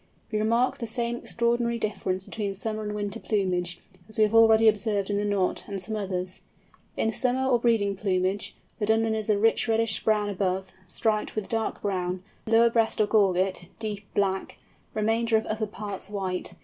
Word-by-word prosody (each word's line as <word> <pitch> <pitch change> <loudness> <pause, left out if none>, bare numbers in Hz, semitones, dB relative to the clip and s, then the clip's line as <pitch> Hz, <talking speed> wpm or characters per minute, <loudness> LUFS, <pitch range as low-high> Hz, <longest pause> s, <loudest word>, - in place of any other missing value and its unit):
We 215 - 0
remark 230 +4 +2
the 230 - -3
same 235 +1 -2
extraordinary 235 0 0
difference 190 -4 -2
between 200 -3 -3
summer 215 +2 -3
and 210 -1 -4
winter 205 +1 -3
plumage, 180 -5 -1 0.3
as 220 - -9
we 215 - +5
have 210 +1 +2
already 225 0 +6
observed 205 -1 +1
in 200 - +1
the 205 - 0
Knot 200 -3 0
and 200 -1 -4
some 215 +4 -3
others. 185 -3 -4 0.6
In 225 - +1
summer 260 +2 +1
or 245 -2 +3
breeding 225 -4 +2
plumage, 190 0 -1 0.2
the 210 - -1
Dunlin 225 0 +3
is 220 0 -1
rich 215 +3 +3
reddish 225 -1 +1
brown 210 -1 +2
above, 190 -1 -1 0.2
striped 215 +3 -1
with 215 -3 -2
dark 225 -1 -2
brown; 185 -2 -2 0.2
lower 230 +1 +5
breast 225 -1 +2
or 215 - +5
gorget, 190 -3 +2
deep 210 -2 -4
black; 190 -1 0 0.4
remainder 225 +1 +2
of 220 - -2
under 215 0 -2
parts 205 -2 -6
white. 185 -3 -3
210 Hz, 175 wpm, -27 LUFS, 195-225 Hz, 0.6 s, already